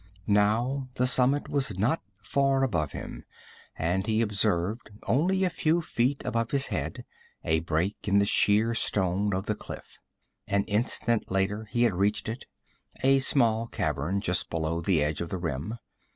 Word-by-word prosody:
Now 115 +6 +1
the 125 - +1
summit 130 +2 +2
was 130 -9 -1
not 110 +7 +1 0.2
far 135 -1 +1
above 85 - 0
him, - - -8 0.5
and 90 +5 -1
he 110 0 +2
observed, 100 0 0 0.2
only 185 +9 +2
a 185 - +2
few 165 +1 +1
feet 135 -4 -1
above 115 -2 -1
his 140 +1 +2
head, - - -4 0.4
a 80 0 +2
break 85 +6 -2
in 100 0 +3
the 100 - +4
sheer 105 +2 +3
stone 100 -2 +2
of 95 0 -2
the - - 0
cliff. - - -10 0.5
An 100 0 +1
instant 115 +1 0
later 95 +3 -1
he 120 +3 0
had 115 -4 +3
reached 100 +5 0
it 115 +3 -6 0.6
a 135 +1 +5
small 115 -4 +3
cavern, 90 0 -2
just 90 -3 0
below 80 0 -2
the 85 -3 +2
edge 75 +2 -2
of 85 - -4
the 95 - -3
rim. 85 - -4
105 Hz, 165 wpm, -27 LUFS, 95-125 Hz, 0.6 s, a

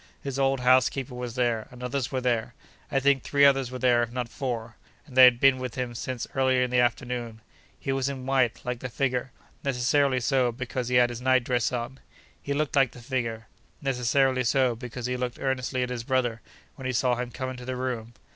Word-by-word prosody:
His 140 -1 -4
old 135 -1 +2
housekeeper 130 +1 +3
was 125 -1 -5
there, 120 -3 0
and 125 0 -11
others 125 0 -2
were 130 -1 -1
there: 120 -3 -1 0.4
I 135 - +2
think 135 -1 +3
three 140 0 +3
others 135 -2 +4
were 130 - -6
there, 125 -2 +3
if 120 0 -2
not 125 -1 -3
four, 115 -4 -4 0.3
and 130 - -14
they 130 0 +10
had 120 -1 +5
been 135 -1 +5
with 125 -3 -5
him 125 -2 -3
since 120 +1 -4
early 130 -1 +2
in 125 - -2
the 125 - +3
afternoon. 120 -2 -1 0.4
He 135 - -3
was 135 0 0
in 130 -2 -6
white, 130 -3 +1
like 125 -1 -3
the 125 - -5
figure—necessarily 130 +1 -1
so, 125 -1 +2
because 125 0 -4
he 125 - 0
had 120 -1 +5
his 120 0 -7
night 130 -1 +3
dress 120 -1 0
on. 125 +2 -4 0.4
He 140 - -6
looked 150 0 -1
like 135 -3 +3
the - - -12
figure—necessarily 125 +2 -1
so, 130 0 +2
because 125 0 -7
he 125 0 -1
looked 125 -1 -3
earnestly 130 -1 -1
at 125 - -3
his 120 -2 -4
brother 120 -3 0 0.4
when 130 -2 -5
he 130 - -1
saw 125 +1 +2
him 125 0 -3
come 130 +1 -4
into 125 -1 -9
the 130 0 -3
room. 120 -2 -4
125 Hz, 210 wpm, -27 LUFS, 120-130 Hz, 0.4 s, they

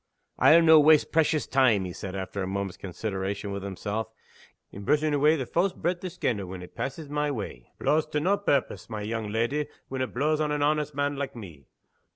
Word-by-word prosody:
"I'll 165 +1 +7
no' 160 -1 +8
waste 150 0 +5
precious 155 -2 +2
time," 125 -8 +3
he 90 - -6
said, 95 +1 -6
after 95 +1 -4
a 95 - -2
moment's 95 -1 -3
consideration 100 +1 -4
with 100 0 -4
himself, 100 +3 -4 0.6
"in 100 - -9
brushing 150 +6 +2
awa' 150 +3 +4
the 130 - -3
fawse 175 +9 +1
breath 175 +1 -2
o' - - -2
scandal, 105 - -2
when 90 0 -7
it 90 - -12
passes 145 +3 -5
my 150 +1 -1
way. 100 - -6
It - - -10
blaws 155 +1 +2
to 150 - -1
nae 190 +7 +2
purpose, 145 -13 -1
my 110 -2 -4
young 110 0 -3
leddy, 115 +7 0 0.2
when 130 -1 -3
it 130 - -2
blaws 150 +4 +1
on 150 -1 0
an 150 -1 0
honest 150 -1 0
man 145 0 -1
like 140 -1 -4
me. 85 - -11
135 Hz, 210 wpm, -27 LUFS, 100-150 Hz, 0.6 s, no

